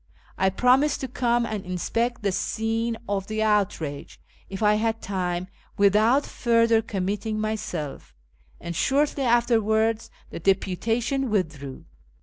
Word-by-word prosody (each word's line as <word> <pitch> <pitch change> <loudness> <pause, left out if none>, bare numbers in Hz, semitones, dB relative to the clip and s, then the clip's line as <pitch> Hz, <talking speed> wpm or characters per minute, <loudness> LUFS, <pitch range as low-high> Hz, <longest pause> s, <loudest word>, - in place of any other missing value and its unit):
I 190 - +2
promised 255 +8 +3
to 265 - -2
come 240 -1 +1
and 215 -3 -4
inspect 230 +6 -2
the 200 - +1
scene 225 +3 -1
of 195 -1 -2
the 215 0 -1
outrage, 185 -9 -1 0.3
if 195 +2 -5
I 210 0 +5
had 225 +1 0
time, 180 -3 -2 0.3
without 215 +7 +4
further 230 -1 +2
committing 210 +1 -3
myself; 205 - -4 0.4
and 170 0 -6
shortly 280 - +1
afterwards 225 -2 +2 0.2
the - - -6
deputation 225 +8 0
withdrew. 150 -10 -3
215 Hz, 125 wpm, -25 LUFS, 190-235 Hz, 0.4 s, I